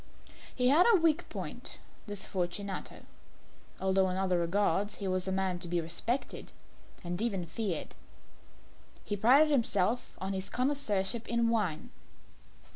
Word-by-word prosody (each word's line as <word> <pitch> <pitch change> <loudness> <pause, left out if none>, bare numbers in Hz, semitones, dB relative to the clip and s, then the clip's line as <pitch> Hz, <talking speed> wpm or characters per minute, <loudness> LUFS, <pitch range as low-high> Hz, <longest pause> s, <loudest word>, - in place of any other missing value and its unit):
He 250 0 +3
had 320 - +6
a 430 - +6
weak 330 +1 +2
point - - -6 0.3
this 205 -1 -5
Fortunato 190 +1 -4 0.7
although 190 0 +2
in 185 - -2
other 185 -2 +1
regards 200 +3 +1
he 200 - -4
was 185 0 -1
a - - 0
man 190 -2 0
to 175 - -5
be 175 0 0
respected 170 +11 -2 0.5
and 175 +2 -3
even 200 -7 -1
feared. 175 0 -3 1.1
He 205 - -1
prided 265 +9 +5
himself 230 -3 +1
on 190 +1 -3
his 190 0 -3
connoisseurship 235 -5 0
in 235 0 +2
wine. 200 -9 -1
195 Hz, 135 wpm, -31 LUFS, 185-235 Hz, 1.1 s, had